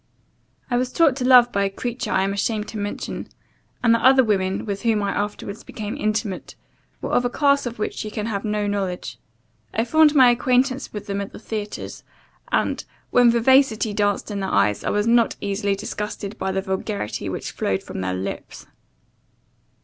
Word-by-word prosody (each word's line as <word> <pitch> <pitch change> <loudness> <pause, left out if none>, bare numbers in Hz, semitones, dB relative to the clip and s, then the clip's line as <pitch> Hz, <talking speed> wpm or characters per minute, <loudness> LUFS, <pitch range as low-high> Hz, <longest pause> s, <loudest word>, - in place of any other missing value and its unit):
I 245 - +2
was 250 0 -1
taught 315 -5 +4
to 260 - -2
love 250 -2 +7
by 200 -2 +1
a 195 - +1
creature 240 +5 -4
I 190 - +2
am 195 +1 0
ashamed 210 +1 -1
to 220 - -6
mention; 205 0 -4 0.6
and 230 -1 +5
the 230 - +1
other 260 0 +7
women 195 -4 0
with 200 -2 -3
whom 220 -3 +1
I 200 - 0
afterwards 205 +1 -4
became 215 -1 -6
intimate, 215 -3 -2 0.5
were - - -3
of 245 - +3
a 245 - +1
class 280 0 +2
of 235 - -6
which 215 - -3
you 215 - -5
can 210 0 -4
have 205 -3 -3
no 210 -1 -1
knowledge. 195 -3 -3 0.6
I 225 - +1
formed 315 +3 +5
my 255 -3 +7
acquaintance 255 +2 +1
with 205 -1 -6
them 200 -1 -2
at 200 - -7
the - - -9
theaters; 215 -1 -6 0.5
and, - - 0 0.3
when 245 -1 +6
vivacity 235 -2 +3
danced 205 0 0
in 200 - -3
their 190 -1 -2
eyes, 100 +1 +2
I - - -1
was 205 0 +1
not 230 0 +3
easily 200 0 -1
disgusted 210 0 -5
by 190 - -1
the 190 0 -1
vulgarity 190 - -3
which - - -4
flowed 95 0 -1
from - - -6
their 95 0 -2
lips. 95 +1 -6
210 Hz, 190 wpm, -22 LUFS, 200-240 Hz, 0.6 s, love